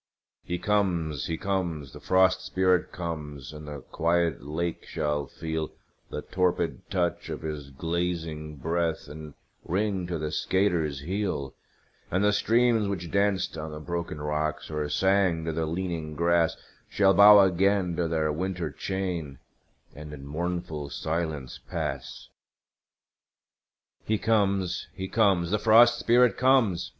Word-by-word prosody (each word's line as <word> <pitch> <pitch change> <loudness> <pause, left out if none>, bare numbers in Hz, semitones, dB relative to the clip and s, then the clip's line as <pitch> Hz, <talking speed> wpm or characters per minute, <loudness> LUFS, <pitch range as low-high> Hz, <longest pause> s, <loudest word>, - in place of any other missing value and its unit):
He 90 - -3
comes, 85 -8 0
he 80 - -2
comes, 85 -8 -2
the - - -9
Frost 95 0 +3
Spirit 95 -1 +1
comes 75 -5 -6
and 75 0 -9
the 75 -2 -7
quiet 85 +2 0
lake 80 +5 -3
shall 75 -2 -2
feel 80 -1 -4 0.4
The - - -5
torpid 90 -6 -1
touch 90 -3 -1
of - - -5
his 75 -3 -5
glazing 80 0 -3
breath, 80 +3 -1
and 75 0 -9 0.3
ring 95 0 -1
to 85 -1 -2
the 75 -1 -3
skater's 80 -6 0
heel; 90 -5 -2 0.6
And 95 +3 +1
the 105 0 +4
streams 115 0 +3
which 90 -4 -4
danced 100 -4 +1
on 80 +1 -5
the 75 - -7
broken 85 -1 -4
rocks, 75 0 -2
or 75 -1 -2
sang 95 -1 +2
to 80 - -1
the 80 0 -1
leaning 85 -2 -3
grass, 85 0 +2 0.3
Shall 95 -1 +4
bow 105 +1 +9
again 95 -1 +2
to 85 - +1
their 80 -2 0
winter 90 +2 -3
chain, 90 -7 -3 0.6
and 75 0 -9
in 70 -2 -9
mournful 80 -1 -3
silence 80 -3 -3
pass. - - -4 1.7
He 110 - 0
comes, 100 -5 +1
he 95 - -4
comes, 95 -5 +2
the 105 - +2
Frost 120 +2 +6
Spirit 120 -2 +4
comes! 125 -9 +3
85 Hz, 140 wpm, -27 LUFS, 75-95 Hz, 1.7 s, bow